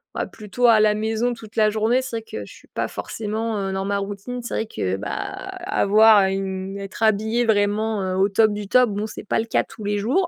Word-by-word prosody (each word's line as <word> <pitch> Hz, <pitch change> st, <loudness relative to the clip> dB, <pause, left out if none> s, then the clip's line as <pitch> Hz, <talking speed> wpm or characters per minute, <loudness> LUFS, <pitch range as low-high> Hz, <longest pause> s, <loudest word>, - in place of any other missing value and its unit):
bah, -, -, -1 dB
plutôt 215 Hz, +4 st, -3 dB
à 230 Hz, -2 st, +7 dB
la 215 Hz, 0 st, +4 dB
maison, 220 Hz, +3 st, 0 dB
toute 220 Hz, -1 st, -13 dB
la 215 Hz, -2 st, +4 dB
journée, 220 Hz, +4 st, +1 dB
c'est 260 Hz, -2 st, -6 dB
vrai 225 Hz, -, -6 dB
que 105 Hz, -, -7 dB
je 100 Hz, -, -12 dB
suis -, -, -16 dB
pas -, -, -2 dB
forcément, 220 Hz, 0 st, -3 dB
heu, 195 Hz, -1 st, -2 dB
dans 190 Hz, 0 st, -2 dB
ma 200 Hz, 0 st, 0 dB
routine, 205 Hz, +5 st, -5 dB
c'est 240 Hz, -, -5 dB
vrai 225 Hz, -, -1 dB
que, 95 Hz, -, -2 dB
bah, 105 Hz, +1 st, -5 dB
avoir 215 Hz, 0 st, +3 dB
une 190 Hz, 0 st, -3 dB
être 200 Hz, +3 st, -6 dB
habillée 220 Hz, +2 st, +2 dB
vraiment, 215 Hz, 0 st, +1 dB
heu, 185 Hz, -1 st, -2 dB
au 195 Hz, +1 st, +4 dB
top 210 Hz, +2 st, +3 dB
du 205 Hz, -1 st, -5 dB
top, 250 Hz, +3 st, +4 dB
bon 205 Hz, +1 st, -2 dB
c'est 220 Hz, -, -8 dB
pas -, -, 0 dB
le 225 Hz, -, -1 dB
cas 230 Hz, -, +1 dB
tous 225 Hz, -1 st, -12 dB
les 205 Hz, 0 st, -1 dB
jours, 265 Hz, -, +1 dB
215 Hz, 240 wpm, -22 LUFS, 200-225 Hz, -, à